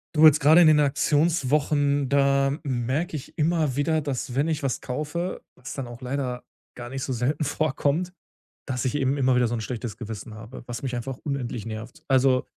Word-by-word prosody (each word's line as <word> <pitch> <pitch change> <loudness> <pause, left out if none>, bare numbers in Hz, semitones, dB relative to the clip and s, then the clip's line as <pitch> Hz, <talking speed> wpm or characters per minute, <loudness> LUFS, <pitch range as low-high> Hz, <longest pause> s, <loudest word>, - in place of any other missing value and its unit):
Du, 155 +1 +7
jetzt 155 -1 +7
gerade 155 +4 +7
in 170 - +7
den 150 -1 +6
Aktionswochen, 145 -1 +2
da 140 -1 +3
merke 135 +5 -1
ich 135 - -8
immer 155 -4 +1
wieder, 160 +2 +1
dass, 130 -3 -4
wenn 145 +4 +1
ich 155 -2 -1
was 135 -3 -2
kaufe, 150 +7 -3
was 130 - -8
dann 135 -3 -5
auch 120 +1 -10
leider 125 -1 -3 0.3
gar 120 -1 -7
nicht 135 +1 -4
so 130 - -2
selten 135 +6 0
vorkommt, 155 +4 0 0.6
dass 130 -2 -2
ich 130 +1 -1
eben 135 -1 +1
immer 130 -2 +3
wieder 125 -1 +3
so 115 - -3
'n 115 - -3
schlechtes 115 -1 -5
Gewissen 110 -1 -7
habe, 110 +4 -10
was 120 +1 -6
mich 130 -2 -2
einfach 125 +2 -5
unendlich 130 -6 -3
nervt. 115 +1 -8
Also, 130 -1 +3
135 Hz, 195 wpm, -25 LUFS, 125-150 Hz, 0.6 s, Du